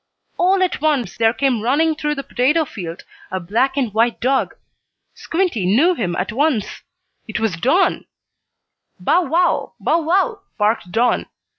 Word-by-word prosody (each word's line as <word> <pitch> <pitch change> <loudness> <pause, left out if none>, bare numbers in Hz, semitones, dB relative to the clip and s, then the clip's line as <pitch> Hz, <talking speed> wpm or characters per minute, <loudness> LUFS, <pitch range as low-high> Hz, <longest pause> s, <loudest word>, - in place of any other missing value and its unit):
All 375 +1 +3
at 360 - -1
once 265 - 0
there 225 +2 +3
came 250 -2 0
running 295 +8 +2
through 300 -1 -2
the 275 - -5
potato 280 +5 +1
field 175 - -8 0.3
a 190 - -3
black 235 +10 0
and 245 -7 -1
white 230 +2 +1
dog. 265 +2 0 0.6
Squinty 335 - -1
knew 280 - +4
him 175 - -2
at - - -2
once. 265 -3 -1 0.5
It 220 - -3
was 220 -6 0
Don! 270 - +1 0.9
"Bow 265 - +2
wow! 350 +3 +1
Bow 335 - +1
wow!" 390 +7 +1 0.2
barked 210 -4 0
Don. 235 +4 +1
265 Hz, 150 wpm, -19 LUFS, 220-320 Hz, 0.9 s, knew